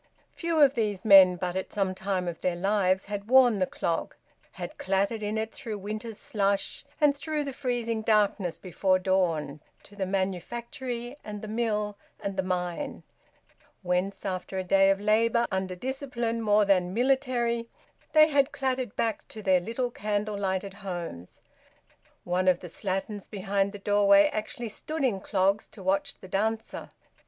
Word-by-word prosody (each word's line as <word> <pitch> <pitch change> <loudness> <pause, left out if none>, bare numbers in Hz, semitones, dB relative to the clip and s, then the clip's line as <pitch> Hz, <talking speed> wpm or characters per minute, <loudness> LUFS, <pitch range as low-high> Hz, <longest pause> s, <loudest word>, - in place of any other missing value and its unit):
Few 335 -2 -1
of 280 -3 +6
these 210 -4 -2
men 190 -3 +8
but 180 0 -3
at 190 - -3
some 195 -3 0
time 190 -1 -2
of 170 -1 -5
their 180 -1 0
lives 190 0 +1
had 205 0 -5
worn 250 -5 +6
the 185 - +2
clog, 165 - -2 0.4
had 175 -2 -7
clattered 200 +4 0
in 210 +1 -2
it 220 0 -2
through 220 -2 -6
winter's 215 +2 -6
slush, 200 -7 -1 0.2
and 295 -2 +4
through 300 +1 -2
the 275 -1 -5
freezing 240 -4 -2
darkness 205 -5 +1
before 185 +1 +1
dawn, 165 -6 0 0.2
to 205 - -15
the 195 -2 -2
manufactory 235 - -3
and 210 -1 -7
the - - -5
mill 210 -2 -1 0.2
and 200 -1 -4
the 190 - +1
mine, 180 +8 -3 0.8
whence 180 +3 -1
after 190 0 -3
a 190 - -1
day 195 +1 +4
of 195 0 +2
labour 230 +3 +3
under 190 -1 -2
discipline 240 0 -3
more 210 -1 +4
than 185 -2 +2
military, 245 -2 +1 0.4
they 310 -1 +8
had 280 -1 +2
clattered 260 -4 -2
back 225 -1 -1
to 215 - -9
their 185 -2 +4
little 230 +6 -3
candle 210 -1 -2
lighted 195 -1 -2
homes. 175 - -7 0.8
One 180 +1 0
of 180 -1 +4
the 180 - -8
slatterns 195 +3 -4
behind 200 0 -1
the 205 - -8
doorway 200 0 +5
actually 220 +2 -4
stood 310 +8 -4
in 230 -7 +1
clogs 195 +1 +1
to 200 - -13
watch 190 +1 0
the 190 - -11
dancer. 220 +4 -2
205 Hz, 165 wpm, -28 LUFS, 190-235 Hz, 0.8 s, men